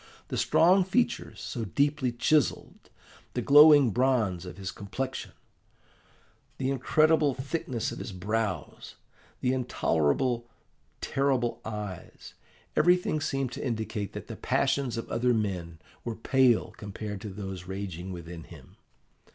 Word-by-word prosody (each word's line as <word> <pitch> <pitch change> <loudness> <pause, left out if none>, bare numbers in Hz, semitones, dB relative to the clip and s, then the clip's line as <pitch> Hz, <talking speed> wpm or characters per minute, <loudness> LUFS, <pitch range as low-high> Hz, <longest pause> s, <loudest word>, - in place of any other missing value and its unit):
The - - -3
strong 185 +3 +4
features, 235 +6 -1
so 120 - -4
deeply 140 +4 +1
chiselled; 145 +5 0 0.5
the - - 0
glowing 145 -3 +8
bronze 110 -7 +1
of 90 - -9
his 95 -1 -5
complexion; 130 +7 -5 1.3
the 135 0 -1
incredible 150 +2 +3
thickness 130 -3 -3
of - - -7
his 115 - -6
brows; 105 +2 -3 0.5
the 125 0 +2
intolerable, 120 - 0 0.5
terrible 135 -3 0
eyes 105 -4 -7 0.4
everything 175 -2 +3
seemed 135 -4 -1
to - - -6
indicate 110 -5 -3
that - - -6
the - - -7
passions 135 -3 0
of 115 - -4
other 120 +1 +2
men 90 -6 -2 0.3
were 115 -2 -4
pale 120 -1 +3
compared 105 -1 -6
to 105 - -6
those 95 -2 -6
raging 95 -2 -5
within 85 -2 -8
him. - - -15
120 Hz, 125 wpm, -28 LUFS, 100-135 Hz, 1.3 s, glowing